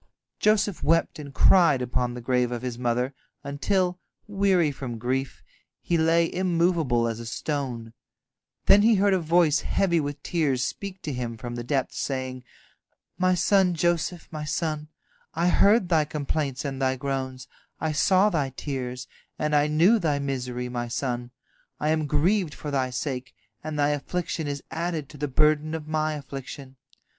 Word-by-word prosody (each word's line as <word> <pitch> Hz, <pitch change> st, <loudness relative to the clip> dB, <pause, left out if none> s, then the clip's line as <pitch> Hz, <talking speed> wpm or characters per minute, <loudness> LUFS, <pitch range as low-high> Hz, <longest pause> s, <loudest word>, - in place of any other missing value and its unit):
Joseph 210 Hz, -3 st, +2 dB
wept 165 Hz, -1 st, +2 dB
and 145 Hz, -2 st, -8 dB
cried 170 Hz, -2 st, +5 dB
upon 125 Hz, 0 st, -1 dB
the 125 Hz, -, -6 dB
grave 125 Hz, 0 st, +1 dB
of 120 Hz, 0 st, -4 dB
his 125 Hz, -2 st, -3 dB
mother, 125 Hz, +2 st, 0 dB, 0.3 s
until, 180 Hz, +6 st, 0 dB, 0.3 s
weary 195 Hz, -6 st, +2 dB
from 125 Hz, -4 st, -6 dB
grief, 130 Hz, +4 st, -3 dB, 0.4 s
he 175 Hz, -, -1 dB
lay 165 Hz, +1 st, +3 dB
immovable 170 Hz, -9 st, +1 dB
as 115 Hz, -1 st, -3 dB
a 115 Hz, -, -7 dB
stone. 125 Hz, -3 st, -4 dB, 0.7 s
Then 205 Hz, -, +7 dB
he 225 Hz, +1 st, +5 dB
heard 200 Hz, 0 st, +3 dB
a 190 Hz, -, +3 dB
voice 165 Hz, -1 st, +3 dB
heavy 175 Hz, -4 st, +1 dB
with 145 Hz, -1 st, -4 dB
tears 140 Hz, -7 st, 0 dB
speak 195 Hz, -1 st, -6 dB
to 150 Hz, -, -3 dB
him 120 Hz, -2 st, -4 dB
from 120 Hz, +2 st, -6 dB
the 120 Hz, 0 st, -4 dB
depths, 135 Hz, +1 st, -1 dB
saying: 130 Hz, -2 st, -3 dB, 0.8 s
"My 185 Hz, 0 st, +3 dB
son 185 Hz, 0 st, +3 dB
Joseph, 175 Hz, 0 st, 0 dB
my 155 Hz, -1 st, -5 dB
son, 155 Hz, 0 st, -2 dB, 0.5 s
I 170 Hz, +2 st, +2 dB
heard 200 Hz, +2 st, +4 dB
thy 160 Hz, -3 st, +3 dB
complaints 145 Hz, -2 st, -3 dB
and 135 Hz, -1 st, -4 dB
thy 130 Hz, 0 st, +2 dB
groans, 130 Hz, -1 st, -4 dB, 0.3 s
I 160 Hz, -, -1 dB
saw 185 Hz, +7 st, +3 dB
thy 145 Hz, -5 st, 0 dB
tears, 130 Hz, -2 st, -5 dB, 0.3 s
and 150 Hz, 0 st, 0 dB
I 145 Hz, 0 st, +4 dB
knew 170 Hz, +10 st, +4 dB
thy 155 Hz, -6 st, +1 dB
misery, 125 Hz, -3 st, -3 dB
my 120 Hz, -1 st, -3 dB
son. 120 Hz, 0 st, -3 dB, 0.5 s
I 150 Hz, -, 0 dB
am 155 Hz, -1 st, +1 dB
grieved 165 Hz, +3 st, +1 dB
for 150 Hz, -, -6 dB
thy 130 Hz, -2 st, 0 dB
sake, 130 Hz, 0 st, -4 dB, 0.3 s
and 155 Hz, -1 st, -4 dB
thy 145 Hz, 0 st, +3 dB
affliction 160 Hz, +2 st, -2 dB
is 140 Hz, -1 st, -4 dB
added 165 Hz, -3 st, -3 dB
to 150 Hz, -, -12 dB
the 145 Hz, -, -1 dB
burden 155 Hz, +3 st, +2 dB
of 155 Hz, -2 st, -6 dB
my 155 Hz, 0 st, 0 dB
affliction. 135 Hz, -1 st, -8 dB
150 Hz, 165 wpm, -26 LUFS, 130-170 Hz, 0.8 s, Then